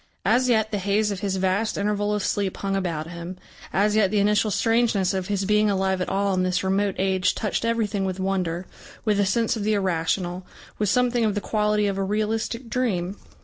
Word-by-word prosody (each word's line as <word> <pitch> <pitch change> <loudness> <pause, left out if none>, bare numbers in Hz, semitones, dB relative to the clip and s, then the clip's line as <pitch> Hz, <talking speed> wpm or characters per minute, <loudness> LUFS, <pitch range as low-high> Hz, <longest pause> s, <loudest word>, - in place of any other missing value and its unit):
As 245 +5 +3
yet 220 -2 +2
the 205 - -1
haze 205 +2 +1
of 200 - -4
his 195 -1 -1
vast 190 +3 0
interval 205 0 0
of 205 - -2
sleep 200 -2 -1
hung 195 -1 -2
about 170 -5 -2
him, 175 +1 -7 0.3
as 210 +2 +2
yet 210 -3 +4
the 210 - 0
initial 210 +1 +3
strangeness 225 -3 +2
of 190 -1 -2
his 200 -1 -1
being 210 +1 +3
alive 190 -1 0
at - - -2
all 195 0 +1
in 185 - +1
this 185 0 0
remote 195 +1 +1
age 190 -1 +1
touched 210 0 -2
everything 225 -3 0
with 190 0 -3
wonder, 185 -2 -1 0.4
with 210 -2 +2
a 200 - +2
sense 230 +4 +1
of 215 - -3
the 215 +1 +2
irrational, 180 -1 -1 0.4
with 210 -2 +1
something 245 0 +2
of 215 -2 +1
the - - +1
quality 210 0 +1
of 195 -1 -1
a - - +1
realistic 220 +4 -2
dream. 200 -7 -1
200 Hz, 210 wpm, -24 LUFS, 190-215 Hz, 0.4 s, yet